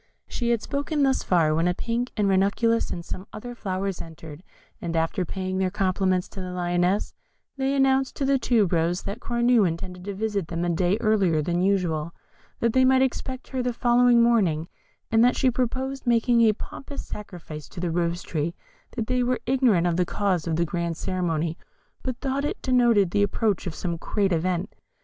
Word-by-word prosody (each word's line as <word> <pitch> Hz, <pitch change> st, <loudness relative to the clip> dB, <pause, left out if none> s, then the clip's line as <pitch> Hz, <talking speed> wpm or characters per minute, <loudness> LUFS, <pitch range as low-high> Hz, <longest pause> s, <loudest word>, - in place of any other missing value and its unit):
She 240 Hz, -2 st, -2 dB
had 235 Hz, -2 st, +1 dB
spoken 285 Hz, +1 st, -1 dB
thus 270 Hz, -1 st, +2 dB
far, 165 Hz, -4 st, +2 dB
when 165 Hz, +2 st, +2 dB
a 180 Hz, -, +1 dB
pink, 235 Hz, +4 st, -2 dB
a 210 Hz, -, +2 dB
ranunculus, 200 Hz, +4 st, +2 dB
and 170 Hz, -1 st, -5 dB
some 185 Hz, +2 st, -6 dB
other 245 Hz, +3 st, -7 dB
flowers 195 Hz, -4 st, -3 dB
entered, 160 Hz, -1 st, -10 dB, 0.4 s
and 170 Hz, -1 st, -3 dB
after 165 Hz, +3 st, 0 dB
paying 185 Hz, +1 st, -3 dB
their 190 Hz, -1 st, +1 dB
compliments 185 Hz, -1 st, 0 dB
to 195 Hz, -, -8 dB
the 185 Hz, -, -5 dB
Lioness, 180 Hz, +2 st, 0 dB, 0.4 s
they 270 Hz, 0 st, 0 dB
announced 270 Hz, -1 st, +2 dB
to 275 Hz, -, -1 dB
the 270 Hz, 0 st, +3 dB
Tube 220 Hz, -8 st, +2 dB
rose 170 Hz, +2 st, +1 dB
that 200 Hz, +4 st, -5 dB
Cornue 240 Hz, -1 st, +2 dB
intended 180 Hz, +2 st, -5 dB
to 200 Hz, -1 st, -4 dB
visit 205 Hz, -4 st, -2 dB
them 170 Hz, +1 st, -2 dB
a -, -, 0 dB
day 175 Hz, +3 st, +1 dB
earlier 200 Hz, -8 st, +2 dB
than 175 Hz, +2 st, 0 dB
usual; 170 Hz, -5 st, 0 dB, 0.5 s
that 230 Hz, -1 st, +2 dB
they 260 Hz, -, +4 dB
might 260 Hz, 0 st, +5 dB
expect 260 Hz, 0 st, -3 dB
her 260 Hz, -1 st, -2 dB
the 245 Hz, 0 st, -1 dB
following 240 Hz, 0 st, +4 dB
morning, 185 Hz, -10 st, +2 dB, 0.4 s
and 225 Hz, 0 st, +5 dB
that 245 Hz, -, +4 dB
she 260 Hz, -2 st, +2 dB
proposed 260 Hz, +2 st, -2 dB
making 235 Hz, 0 st, +3 dB
a 220 Hz, -2 st, +5 dB
pompous 275 Hz, +6 st, -8 dB
sacrifice 175 Hz, -7 st, -8 dB
to -, -, -9 dB
the 175 Hz, -1 st, -1 dB
Rose 170 Hz, +1 st, -1 dB
tree; 160 Hz, +1 st, -2 dB, 0.4 s
that 230 Hz, -3 st, -2 dB
they 255 Hz, +2 st, 0 dB
were 250 Hz, 0 st, +1 dB
ignorant 245 Hz, -9 st, +3 dB
of 175 Hz, -1 st, +1 dB
the 180 Hz, -, +3 dB
cause 185 Hz, -4 st, -1 dB
of 160 Hz, -, 0 dB
this 170 Hz, +1 st, +1 dB
grand 170 Hz, 0 st, -3 dB
ceremony, 170 Hz, -3 st, -2 dB, 0.4 s
but 255 Hz, -2 st, -4 dB
thought 270 Hz, +1 st, -2 dB
it 295 Hz, -, -2 dB
denoted 240 Hz, -8 st, +3 dB
the 205 Hz, -, +2 dB
approach 205 Hz, -1 st, 0 dB
of 165 Hz, -, -4 dB
some 170 Hz, -2 st, -3 dB
great 195 Hz, +3 st, 0 dB
event. 175 Hz, +1 st, -1 dB
200 Hz, 195 wpm, -25 LUFS, 175-240 Hz, 0.5 s, might